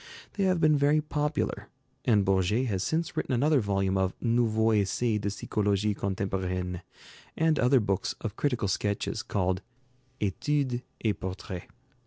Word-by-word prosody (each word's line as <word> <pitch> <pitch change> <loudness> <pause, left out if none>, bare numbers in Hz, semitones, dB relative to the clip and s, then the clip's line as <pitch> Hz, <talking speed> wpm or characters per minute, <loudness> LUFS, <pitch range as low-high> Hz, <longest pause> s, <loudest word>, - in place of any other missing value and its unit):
They 200 - 0
have 185 -2 +2
been 155 -1 +5
very 145 +2 +3
popular, 150 0 -2 0.4
and 105 -5 +4
Bourget 95 +6 +2
has 100 -6 -1
since 165 +1 -1
written - - -1
another 145 +4 +3
volume 95 -3 0
of 95 -1 0
'Nouveaux 115 -2 +2
Essais 105 +2 +1
de 100 - -1
Psychologie 105 0 0
Contemporaine,' 95 -2 -2 0.6
and 160 -1 +2
other 125 +2 +5
books 100 -3 -1
of 110 -1 -5
critical 125 -7 0
sketches 100 +3 -1
called 95 -5 -1 0.6
'Études 125 +5 0 0.2
et 105 - +1
Portraits.' 95 -1 -6
105 Hz, 140 wpm, -28 LUFS, 95-130 Hz, 0.6 s, been